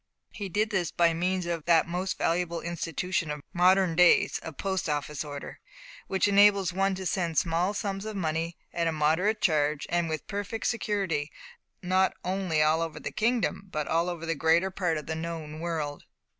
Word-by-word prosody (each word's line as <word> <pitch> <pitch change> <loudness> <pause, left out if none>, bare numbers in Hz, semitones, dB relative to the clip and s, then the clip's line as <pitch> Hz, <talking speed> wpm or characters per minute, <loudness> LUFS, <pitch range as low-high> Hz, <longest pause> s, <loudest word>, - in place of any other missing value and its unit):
He 200 -2 -6
did 215 +5 0
this 185 -4 0
by 170 -1 +3
means 180 +2 -1
of 170 -3 -3
that 165 -2 +4
most 180 +2 -2
valuable 170 0 0
institution 170 0 -2
of 150 -1 -5
modern 180 -1 +4
days 180 0 +5
a 160 - -6
Post 190 +3 -2
Office 150 0 -2
order, 145 -2 -8 0.5
which 190 +1 +1
enables 200 -2 +5
one 195 +1 +1
to 190 0 -6
send 170 -3 -1
small 175 +4 +1
sums 195 -1 -3
of 215 -1 -5
money, 165 -2 -2 0.2
at 170 -1 0
a - - +2
moderate 160 +8 +1
charge, 150 -4 +1
and 170 -1 +1
with 155 -1 -3
perfect 205 +2 -4
security, 195 -10 -1 0.5
not 185 +1 +2
only 180 -4 +1
all 155 +2 +3
over 165 -1 -4
the - - -5
kingdom, 225 -3 0
but 150 -1 -2
over 170 0 0
the 165 - 0
greater 165 +5 +2
part 175 -4 -1
of 150 - -6
the 160 - -3
known 160 -1 -5
world. 160 -4 -3
170 Hz, 180 wpm, -28 LUFS, 160-190 Hz, 0.5 s, days